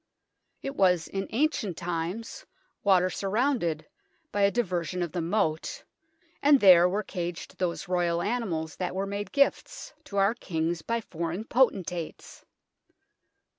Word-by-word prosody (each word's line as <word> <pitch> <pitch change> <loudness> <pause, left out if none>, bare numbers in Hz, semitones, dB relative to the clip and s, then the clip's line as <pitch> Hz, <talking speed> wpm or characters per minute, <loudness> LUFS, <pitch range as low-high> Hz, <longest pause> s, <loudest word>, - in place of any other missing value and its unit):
It 275 - -4
was 180 - +3
in 195 0 -4
ancient 225 - 0
times 175 - -4 0.4
water 185 -2 +4
surrounded 200 - 0 0.5
by 205 - -1
a 200 - +6
diver 185 -7 -1
sion 180 +2 -3
of 170 - -4
the 175 - -2
moat, 160 -3 -1 0.6
and 285 -1 +6
there 180 -4 +7
were 205 +3 -1
caged 175 -4 -6
those 175 -2 -2
Royal 175 -2 +1
animals 190 -8 -2
that 180 0 -3
were 195 +1 -1
made 200 +1 -4
gifts - - 0
to 200 - -6
our 195 +2 +4
kings 165 -6 -2
by 230 +6 -2
foreign 170 +1 -4
potentates. 190 -9 -1
185 Hz, 135 wpm, -28 LUFS, 170-220 Hz, 0.6 s, there